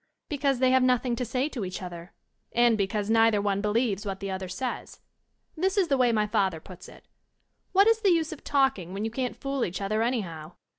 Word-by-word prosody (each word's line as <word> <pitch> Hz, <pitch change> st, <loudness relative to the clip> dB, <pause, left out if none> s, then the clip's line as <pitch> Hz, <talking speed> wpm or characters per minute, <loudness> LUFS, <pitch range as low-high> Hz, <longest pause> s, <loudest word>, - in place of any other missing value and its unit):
VBecause 280 Hz, -2 st, +1 dB
they 255 Hz, +1 st, +3 dB
have 260 Hz, 0 st, +4 dB
nothing 250 Hz, -1 st, +2 dB
to 250 Hz, -, -3 dB
say 255 Hz, +4 st, -1 dB
to 245 Hz, -8 st, -5 dB
each 185 Hz, -1 st, -5 dB
other, 175 Hz, -1 st, -8 dB, 0.4 s
and 240 Hz, -1 st, +4 dB
because 200 Hz, 0 st, -1 dB
neither 225 Hz, -2 st, +4 dB
one 200 Hz, -1 st, 0 dB
believes 210 Hz, -1 st, 0 dB
what 195 Hz, -2 st, -4 dB
the 195 Hz, -1 st, -4 dB
other 190 Hz, -1 st, -5 dB
says. 250 Hz, +7 st, -5 dB, 0.6 s
This 380 Hz, +4 st, 0 dB
is 375 Hz, -4 st, +2 dB
the 275 Hz, -, +3 dB
way 250 Hz, -2 st, +3 dB
my 215 Hz, -2 st, +2 dB
father 190 Hz, -5 st, 0 dB
puts 180 Hz, +2 st, -12 dB
it: -, -, -17 dB, 0.7 s
''What 395 Hz, +1 st, +7 dB
is 450 Hz, 0 st, +3 dB
the 405 Hz, -, +3 dB
use 325 Hz, -3 st, +1 dB
of 305 Hz, -, -13 dB
talk 270 Hz, -5 st, +2 dB
ing, 180 Hz, 0 st, -8 dB
when 205 Hz, +2 st, -2 dB
you 225 Hz, -, -3 dB
can't 250 Hz, +1 st, -3 dB
fool 275 Hz, -2 st, -2 dB
each 175 Hz, -, -3 dB
other 210 Hz, +2 st, -1 dB
anyhow? 180 Hz, -10 st, -3 dB
225 Hz, 225 wpm, -27 LUFS, 195-265 Hz, 0.7 s, What